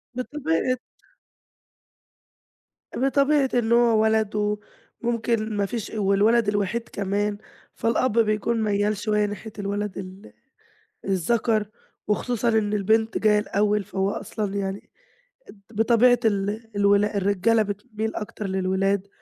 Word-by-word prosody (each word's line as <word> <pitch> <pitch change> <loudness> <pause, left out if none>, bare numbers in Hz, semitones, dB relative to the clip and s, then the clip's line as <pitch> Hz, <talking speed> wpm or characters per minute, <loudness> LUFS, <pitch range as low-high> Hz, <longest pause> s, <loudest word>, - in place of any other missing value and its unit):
بطبيعة 255 - -1 2.2
بطبيعة 275 +1 +2
إن 235 -2 +1
هو 235 -2 +4
ولد 210 -1 +1 0.5
وممكن 230 -2 -1
مفيش 205 +2 -2
والولد 210 +3 +3
الوحيد 205 +3 -1
كمان، 205 +1 -1 0.4
فالأب 230 0 +1
بيكون 220 +1 +1
ميَّال 205 0 +1
شوية 210 0 +1
ناحية 205 +2 -6
الولد 205 0 -3
ال 190 +1 -9 0.7
الذَكر، 210 +3 +1 0.4
وخصوصًا 235 +2 0
إن 215 -2 +1
البنت 220 +2 +1
جاية 210 -1 +3
الأول، 210 0 0
فهو 195 0 -1
أصلًا 205 0 -4
يعني 195 0 -4 0.8
بطبيعة 235 +3 +4
ال 210 +2 -1
الولا 205 +1 +3
الرجالة 200 +3 +2
بتميل 215 +2 -5
أكتر 210 -1 -5
للولاد، 190 +1 0
210 Hz, 105 wpm, -24 LUFS, 200-230 Hz, 2.2 s, هو